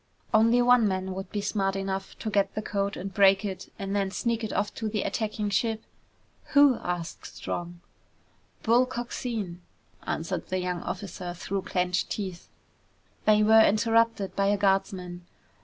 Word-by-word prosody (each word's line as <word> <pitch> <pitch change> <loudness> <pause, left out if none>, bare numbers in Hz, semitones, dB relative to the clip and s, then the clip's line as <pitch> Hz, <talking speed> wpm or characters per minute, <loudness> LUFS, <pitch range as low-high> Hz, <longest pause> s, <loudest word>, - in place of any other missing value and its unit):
"Only 230 +3 +5
one 245 -2 +5
man 190 -1 -2
would 190 0 -6
be 205 - -2
smart 195 -1 0
enough 195 0 -4
to 220 - -4
get 200 -1 +1
the 215 - -2
code 200 -1 -2
and 195 +1 -6
break 195 0 +5
it, 190 -2 -6
and 195 0 -3
then 195 -1 +1
sneak 230 +3 -1
it 220 - -3
off 205 - -1
to 220 - -3
the 210 -1 -1
attacking 210 -2 -2
ship! 220 +2 0 0.7
"Who?" 285 -4 +7
asked 175 -2 -4
Strong. 175 0 -5 0.8
"Bull 240 +3 +4
Coxine!" 235 -7 -4 0.5
answered 160 - -3
the 185 - -1
young 180 -1 -2
officer 180 -3 -5
through 195 +2 -3
clenched 180 -1 -1
teeth. 190 -4 -5 0.8
They 215 0 +5
were 220 +1 +7
interrupted 225 -1 +2
by 195 0 +2
a 205 +1 +3
guardsman. 190 -3 0
200 Hz, 155 wpm, -27 LUFS, 185-220 Hz, 0.8 s, Who